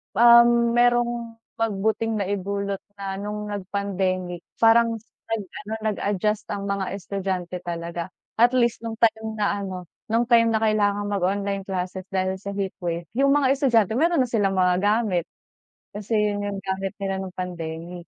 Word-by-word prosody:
um, 235 Hz, 0 st, +7 dB
merong 240 Hz, -1 st, +2 dB, 0.2 s
mabuting 220 Hz, +1 st, 0 dB
naidulot 200 Hz, 0 st, -2 dB, 0.2 s
na 195 Hz, -1 st, -5 dB
nung 210 Hz, +1 st, -4 dB
nag 200 Hz, -2 st, -4 dB
pandemic, 185 Hz, -3 st, -2 dB, 0.2 s
parang 230 Hz, 0 st, +5 dB, 0.3 s
nag-ano 215 Hz, 0 st, -5 dB
nag-adjust 210 Hz, 0 st, -1 dB
ang 200 Hz, -, -4 dB
mga 200 Hz, -1 st, -1 dB
estudyante 185 Hz, -2 st, -3 dB
talaga. 170 Hz, 0 st, -5 dB, 0.3 s
At 240 Hz, +2 st, +5 dB
least 240 Hz, -2 st, +2 dB
no'ng 225 Hz, -, -4 dB
time 220 Hz, 0 st, +2 dB
na 205 Hz, -1 st, 0 dB
ano, 185 Hz, -2 st, -5 dB, 0.2 s
no'ng 230 Hz, +2 st, +1 dB
time 230 Hz, -1 st, +6 dB
na 220 Hz, -, +1 dB
kailangang 205 Hz, -1 st, +1 dB
mag-online 200 Hz, +1 st, -1 dB
classes 185 Hz, 0 st, -3 dB
dahil 190 Hz, 0 st, -1 dB
sa 200 Hz, 0 st, -6 dB
heatwave, 175 Hz, -3 st, -3 dB, 0.2 s
'yung 275 Hz, +1 st, +4 dB
mga 270 Hz, -2 st, +3 dB
estudyante 240 Hz, -7 st, +3 dB
meron 330 Hz, -4 st, +3 dB
na 245 Hz, -, -4 dB
silang 200 Hz, -4 st, +1 dB
mga 180 Hz, -1 st, +3 dB
gamit. 205 Hz, -4 st, +1 dB, 0.7 s
Kasi 210 Hz, +2 st, -6 dB
'yun 205 Hz, -1 st, 0 dB
y'ung 200 Hz, -1 st, -3 dB
gamit 195 Hz, 0 st, -3 dB
nila 195 Hz, -1 st, -2 dB
no'ng 185 Hz, -1 st, -7 dB
pandemic. 170 Hz, -1 st, -5 dB
200 Hz, 150 wpm, -24 LUFS, 190-225 Hz, 0.7 s, um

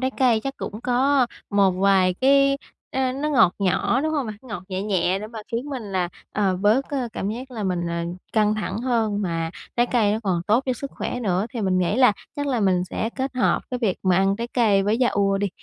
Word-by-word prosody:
trái 260 Hz, 0 st, 0 dB
cây 240 Hz, -4 st, +4 dB
chắc 275 Hz, 0 st, -3 dB
cũng 210 Hz, +3 st, -6 dB
có 260 Hz, +2 st, +2 dB, 0.2 s
một 200 Hz, -2 st, +4 dB
vài 185 Hz, -1 st, +3 dB
cái 275 Hz, +1 st, +4 dB, 0.4 s
ờ, 260 Hz, -1 st, +1 dB
nó 290 Hz, +3 st, -2 dB
ngọt 235 Hz, -11 st, +4 dB
nhỏ, 200 Hz, +6 st, +1 dB
đúng 315 Hz, +2 st, -1 dB
hông 285 Hz, -5 st, -1 dB
bạn? 215 Hz, -1 st, -6 dB
Ngọt 210 Hz, -8 st, -7 dB
nhẹ 190 Hz, 0 st, -3 dB
nhẹ 190 Hz, -2 st, +1 dB
để 210 Hz, -, -6 dB
mà 225 Hz, +1 st, -9 dB
khiến 235 Hz, +4 st, -1 dB
mình 260 Hz, -3 st, -4 dB
là, 190 Hz, -4 st, -2 dB, 0.2 s
ờ, 195 Hz, -3 st, +1 dB
bớt, 215 Hz, +8 st, +2 dB
ờ, 260 Hz, -4 st, -2 dB
cảm 195 Hz, -, -3 dB
giác 255 Hz, +4 st, -6 dB
là 220 Hz, -5 st, -4 dB
mình, 175 Hz, -2 st, -1 dB
ờ, 170 Hz, 0 st, -2 dB, 0.3 s
căng 215 Hz, -1 st, +3 dB
thẳng 215 Hz, 0 st, -3 dB
hơn, 225 Hz, -4 st, 0 dB
mà 165 Hz, -2 st, -2 dB, 0.3 s
trái 240 Hz, 0 st, +3 dB
cây 220 Hz, -5 st, +2 dB
nó 220 Hz, -, 0 dB
còn 180 Hz, -4 st, 0 dB
tốt 230 Hz, +5 st, +3 dB
cho 255 Hz, -, +1 dB
sức 275 Hz, +3 st, -6 dB
khỏe 245 Hz, -, -4 dB
nữa. 195 Hz, -1 st, 0 dB
Thì 235 Hz, -, -5 dB
mình 185 Hz, -2 st, +1 dB
nghĩ 185 Hz, +5 st, +1 dB
là 250 Hz, -5 st, +6 dB, 0.2 s
chắc 285 Hz, 0 st, -2 dB
là 250 Hz, -5 st, 0 dB
mình 185 Hz, -2 st, +2 dB
sẽ 220 Hz, +5 st, -3 dB
kết 265 Hz, 0 st, -3 dB
hợp 255 Hz, -, +2 dB
cái 250 Hz, -, -2 dB
việc 215 Hz, -7 st, 0 dB
mà 185 Hz, -2 st, +3 dB
ăn 195 Hz, +1 st, +2 dB
trái 235 Hz, +1 st, -3 dB
cây 215 Hz, -6 st, +3 dB
với 210 Hz, +4 st, +1 dB
yaourt 200 Hz, -4 st, +2 dB
đi, 205 Hz, 0 st, 0 dB
215 Hz, 240 wpm, -23 LUFS, 195-255 Hz, 0.4 s, là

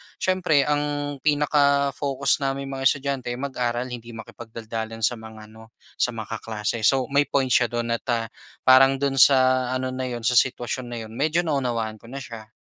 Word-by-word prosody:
siyempre 180 Hz, -6 st, +2 dB
ang 145 Hz, -1 st, -2 dB
pinaka-focus 140 Hz, -2 st, +1 dB
naming 135 Hz, 0 st, -3 dB
mga 135 Hz, -1 st, +1 dB
estudyante, 140 Hz, -2 st, -1 dB
mag-aral 125 Hz, -2 st, -2 dB
hindi 120 Hz, -1 st, -8 dB
makipagdaldalan 115 Hz, 0 st, -7 dB
sa 120 Hz, +2 st, +1 dB
mga 110 Hz, -1 st, -11 dB
ano, 110 Hz, +1 st, -16 dB, 0.2 s
sa 125 Hz, -2 st, +1 dB
mga 110 Hz, 0 st, -5 dB
kaklase. 110 Hz, 0 st, -3 dB
So, 130 Hz, +4 st, +3 dB
may 140 Hz, +1 st, +3 dB
point 135 Hz, -2 st, 0 dB
siya 120 Hz, -, +4 dB
do'n 120 Hz, 0 st, -3 dB
at, -, -, -40 dB
ah, 115 Hz, -1 st, 0 dB, 0.4 s
parang 135 Hz, +1 st, +6 dB
do'n 135 Hz, 0 st, -1 dB
sa 130 Hz, -1 st, +5 dB
ano 130 Hz, 0 st, -2 dB
na 130 Hz, 0 st, -4 dB
yun, 120 Hz, -2 st, -5 dB
sa 120 Hz, 0 st, +5 dB
sitwasyon 125 Hz, -1 st, -2 dB
na 120 Hz, -, -6 dB
yun, 110 Hz, -, -11 dB
medyo 155 Hz, +8 st, 0 dB
naunawaan 120 Hz, -8 st, -2 dB
ko -, -, -16 dB
na 135 Hz, +3 st, -7 dB
siya. 110 Hz, -3 st, -10 dB
130 Hz, 175 wpm, -24 LUFS, 115-140 Hz, 0.4 s, parang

